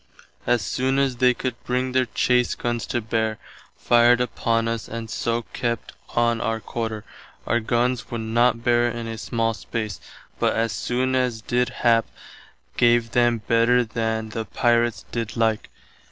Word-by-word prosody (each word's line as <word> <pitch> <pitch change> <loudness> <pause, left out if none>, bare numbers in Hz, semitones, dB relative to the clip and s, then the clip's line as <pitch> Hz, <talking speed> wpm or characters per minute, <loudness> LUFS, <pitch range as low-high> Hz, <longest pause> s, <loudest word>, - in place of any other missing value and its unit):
As 120 -2 +2
soon 130 +1 0
as 135 -3 +1
they 125 0 +4
could 130 0 -2
bring 125 +1 -1
their 130 0 +2
chase 125 +1 +1
gunns 120 -1 -3
to 120 - -1
bear, 110 -1 -1 0.4
fired 120 +1 +4
upon 115 -1 0
us 115 -1 -3
and 115 0 -6
soe 115 0 -1
kept 115 -2 -2 0.2
on 120 -1 +2
our 115 -1 -1
quarter. 110 0 -4 0.4
Our 120 - +1
gunns 120 +2 0
would 115 -1 -4
not 115 +1 +2
bear 120 0 +3
in 120 0 -5
a 115 -1 -5
small 115 0 -1
space, 110 -3 -5 0.4
but - - +2
as 115 0 0
soon 130 +4 -1
as 125 -3 0
did 125 +3 0
hap, 115 -1 +2 0.7
gave 120 -1 +3
them 120 -2 +2
better 120 +1 +4
than 110 -1 -2
[the 110 +1 -4
pirates] 120 -1 +1
did 115 -1 -4
like. 110 -1 +1
115 Hz, 160 wpm, -23 LUFS, 115-120 Hz, 0.7 s, they